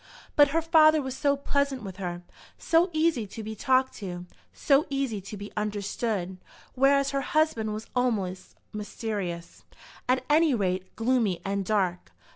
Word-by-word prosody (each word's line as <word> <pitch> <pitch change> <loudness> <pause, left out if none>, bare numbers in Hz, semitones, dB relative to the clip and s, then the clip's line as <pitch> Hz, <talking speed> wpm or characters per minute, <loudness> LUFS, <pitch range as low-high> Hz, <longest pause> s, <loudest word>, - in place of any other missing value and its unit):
But 290 -1 +7
her 320 +3 0
father 310 -1 +6
was 265 -2 -4
so 280 0 +1
pleasant 280 -2 -1
with 190 -2 -8
her, 175 -2 -5 0.3
so 335 +3 +2
easy 310 -8 +1
to 220 +3 -8
be 220 +1 -6
talked 260 +3 +2
to, 180 -3 -6 0.3
so 280 +1 +2
easy 270 -7 -2
to 200 +2 -8
be 205 +1 -8
understood, 205 -2 -2 0.3
whereas 275 +1 +3
her 275 0 0
husband 290 -7 +1
was 215 +1 -5
almost 195 -7 -1 0.2
mysterious, 205 -5 -5 0.5
at 255 0 +2
any 305 -2 +4
rate, 185 -3 -2
gloomy 225 -5 +1
and 200 0 -1
dark. 185 -3 -1
225 Hz, 150 wpm, -27 LUFS, 195-280 Hz, 0.5 s, But